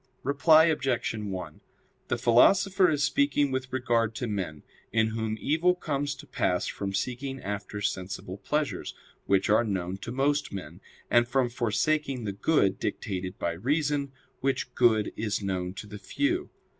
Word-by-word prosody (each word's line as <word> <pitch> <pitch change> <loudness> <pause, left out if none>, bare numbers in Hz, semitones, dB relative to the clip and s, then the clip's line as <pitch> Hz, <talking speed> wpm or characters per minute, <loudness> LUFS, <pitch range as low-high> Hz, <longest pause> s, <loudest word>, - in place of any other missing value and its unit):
Reply 155 +4 +5
Obj. 135 -8 0
1: 95 -7 -6 0.5
The - - 0
Philosopher 185 - +5
is 145 -2 +1
speaking 140 -1 +2
with 130 0 -3
regard 115 -3 +1
to 125 - -3
men, 95 -9 -4 0.3
in 110 -1 +2
whom 110 0 -2
evil 165 +7 +2
comes 145 -4 -2
to 135 - -12
pass - - 0
from 100 -1 -3
seeking 130 +7 -3
after 105 0 -5
sensible 95 -1 -4
pleasures, 150 +3 -2 0.3
which 95 -1 +3
are 110 +3 +4
known 95 -4 -2
to 115 - -6
most 145 +3 0
men, 90 -2 -8 0.3
and 120 0 +5
from 130 -1 +1
forsaking 125 +3 0
the 105 - -2
good 100 -3 +2
dictated 95 -3 -3
by 85 - -1
reason, 140 - 0 0.3
which 135 -2 -1
good 110 -4 +3
is 105 -2 -2
known 90 -2 -2
to 100 - -7
the 105 0 -9
few. 340 - -1
120 Hz, 155 wpm, -28 LUFS, 100-140 Hz, 0.5 s, Reply